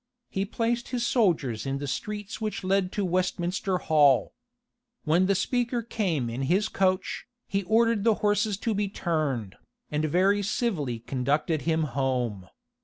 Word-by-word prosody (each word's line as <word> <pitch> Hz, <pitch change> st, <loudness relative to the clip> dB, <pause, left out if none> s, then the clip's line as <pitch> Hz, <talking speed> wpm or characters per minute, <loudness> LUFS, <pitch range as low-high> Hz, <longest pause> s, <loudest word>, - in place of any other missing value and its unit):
He 195 Hz, +1 st, -1 dB
placed 235 Hz, +3 st, -1 dB
his 240 Hz, -2 st, -2 dB
soldiers 170 Hz, -, +1 dB
in 135 Hz, 0 st, -1 dB
the 145 Hz, -, -4 dB
streets 210 Hz, -, -4 dB
which 215 Hz, -2 st, -3 dB
led 190 Hz, 0 st, +1 dB
to 205 Hz, -, 0 dB
Westminster 185 Hz, +1 st, 0 dB
Hall. 145 Hz, -7 st, +3 dB, 0.7 s
When 170 Hz, +4 st, +3 dB
the 200 Hz, -, +3 dB
speaker 240 Hz, +3 st, 0 dB
came 180 Hz, -, -1 dB
in 115 Hz, +3 st, -4 dB
his 205 Hz, +5 st, +2 dB
coach, 185 Hz, -1 st, 0 dB, 0.2 s
he 195 Hz, -, 0 dB
ordered 230 Hz, 0 st, +3 dB
the 225 Hz, -1 st, +4 dB
horses 205 Hz, 0 st, +1 dB
to 225 Hz, -, +2 dB
be 205 Hz, -1 st, -1 dB
turned, 145 Hz, -, -2 dB, 0.3 s
and 150 Hz, +1 st, 0 dB
very 190 Hz, +6 st, +3 dB
civilly 185 Hz, -, -1 dB
conducted 140 Hz, +6 st, -1 dB
him 160 Hz, 0 st, +2 dB
home. 125 Hz, -8 st, -2 dB
185 Hz, 150 wpm, -27 LUFS, 145-210 Hz, 0.7 s, the